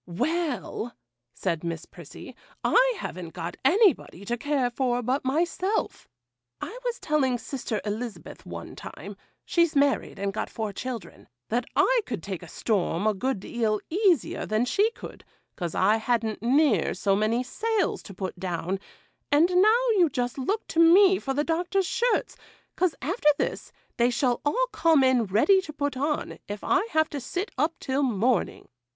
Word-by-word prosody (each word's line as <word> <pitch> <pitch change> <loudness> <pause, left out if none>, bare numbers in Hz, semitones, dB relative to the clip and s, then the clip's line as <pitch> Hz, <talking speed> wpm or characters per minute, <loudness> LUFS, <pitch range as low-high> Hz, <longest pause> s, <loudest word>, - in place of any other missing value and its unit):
'Well,' 255 - -2 0.4
said 170 +4 -3
Miss 165 -1 -4
Prissy, - - -12 0.3
'I - - +4
haven't 170 - -6
got 170 0 -5
anybody 285 - +3
to 235 - -1
care 265 -1 0
for 245 -1 0
but 255 +4 0
myself. 345 +9 -1 0.5
I 465 +7 -6
was 485 -1 -2
telling 270 -5 +1
sister 235 -3 -4
Elizabeth, 215 +2 -5
one - - -8
time - - -9 0.3
(she's 340 -3 +2
married 280 -1 +1
and 195 0 -2
got - - -3
four 215 -2 -4
children), 250 -1 -7 0.2
that 240 +3 0
I - - +4
could 225 -10 -4
take 190 -3 -5
a 175 - -10
storm 195 -1 -1
a 215 - +3
good 255 +3 -2
deal 215 -1 -1
easier 365 - +1
than 215 +3 +1
she 410 - +2
could, - - -11 0.3
'cause 175 -4 -4
I 205 +4 +4
hadn't 225 -1 -1
near 245 - +3
so 195 +1 +1
many 220 +4 +1
sails 435 - -1
to 195 - -11
pull 185 0 -3
down; 185 +1 -2 0.5
and 305 +5 +5
now, 435 +7 +4
you 345 -3 +5
just 245 0 -2
look 405 +12 -1
to 330 - -1
me 370 +3 +7
for 270 -1 -3
the 295 - +1
Doctor's 355 +4 0
shirts, 475 +6 0 0.4
'cause, 365 -4 +1
after 320 - +2
this, - - -3 0.3
they 240 0 +4
shall 245 0 0
all - - +2
come 320 -5 +4
in 255 -3 +3
ready 230 - +4
to 320 - -8
put 285 -2 -2
on, 290 +3 -2
if 205 0 -6
I 435 - +2
have 315 -3 +2
to 290 - -3
sit 355 - -4
up 310 +5 0
till 265 +2 -1
morning. 240 -3 0
260 Hz, 165 wpm, -26 LUFS, 215-335 Hz, 0.5 s, me